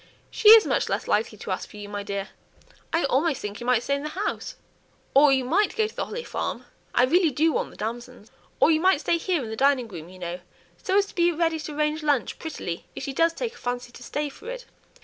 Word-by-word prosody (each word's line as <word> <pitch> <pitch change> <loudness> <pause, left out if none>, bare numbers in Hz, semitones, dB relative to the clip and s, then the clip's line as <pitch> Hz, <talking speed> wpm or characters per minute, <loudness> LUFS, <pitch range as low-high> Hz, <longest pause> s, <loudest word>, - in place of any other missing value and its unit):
"She 425 - +5
is 445 0 +10
much - - 0
less - - -2
likely 215 0 0
to 200 - -6
ask 185 - -3
for - - -12
you, 205 0 -7
my 205 0 -4
dear: 200 0 -4 0.6
I 330 - +1
almost 275 +2 +1
think 205 0 -6
you 240 - -6
might 245 -2 +2
remain 280 - +2
in 280 - -7
the 305 +5 -5
house, - - -4 0.6
or 285 +1 +7
you 265 -2 +2
might 385 +11 +2
go 440 - +2
to 435 - -7
the - - -2
Holly 475 - -5
Farm; - - -4 0.3
I 245 - +5
really 335 +6 +4
do 310 +4 +2
want - - -1
the - - -15
damsons; 235 +1 -6 0.3
or - - +5
you 310 - +3
might 370 -4 +4
stay 335 - +1
here 340 -4 0
in 220 - -6
the - - -3
dining 265 -1 +2
room, 170 -5 -9
you 185 - -13
know, 175 0 -5 0.4
so 380 - +1
as 405 - +4
to - - -14
be 345 -1 +3
ready 330 -1 0
to 305 -1 -6
arrange 300 +1 0
lunch 290 -6 0
prettily, 180 - -5
if - - -6
she 275 - -4
does 330 +4 +3
take 470 +5 -4
a - - -15
fancy 245 0 -4
to 245 - -13
stay 295 +4 -3
for 425 - -10
it. - - -6
280 Hz, 255 wpm, -25 LUFS, 230-335 Hz, 0.6 s, is